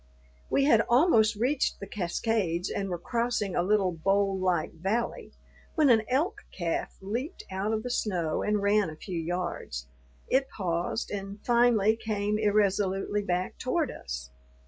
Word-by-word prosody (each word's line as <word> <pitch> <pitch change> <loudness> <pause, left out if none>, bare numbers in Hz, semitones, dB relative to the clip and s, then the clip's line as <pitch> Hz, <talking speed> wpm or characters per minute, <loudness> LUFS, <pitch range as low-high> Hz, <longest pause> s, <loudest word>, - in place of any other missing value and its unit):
We 275 - +3
had 230 -6 +5
almost 235 -5 +5
reached 255 +6 0
the - - -6
cascades 190 -1 -1
and 195 -1 -2
were 175 - -2
crossing 230 0 -1
a - - +3
little 195 0 +2
bowl 195 +4 +1
like 180 -4 0
valley, 195 +8 -2 0.4
when 305 -5 +5
an 225 -2 +5
elk 350 - 0
calf 170 -3 -3
leaped 240 - -4
out 195 +3 -1
of 220 0 -1
the 250 - -3
snow 175 -9 -1
and 210 -1 0
ran 205 -2 +3
a 155 - -8
few 170 +2 -5
yards. 170 - -3 0.4
It 265 +1 +2
paused 175 +3 -2
and 200 0 -5
finally 235 -3 +4
came 210 -1 -1
irresolutely 205 -1 +1
back 180 -2 -2
toward 290 +1 0
us. 65 +1 -7
205 Hz, 150 wpm, -28 LUFS, 180-230 Hz, 0.4 s, had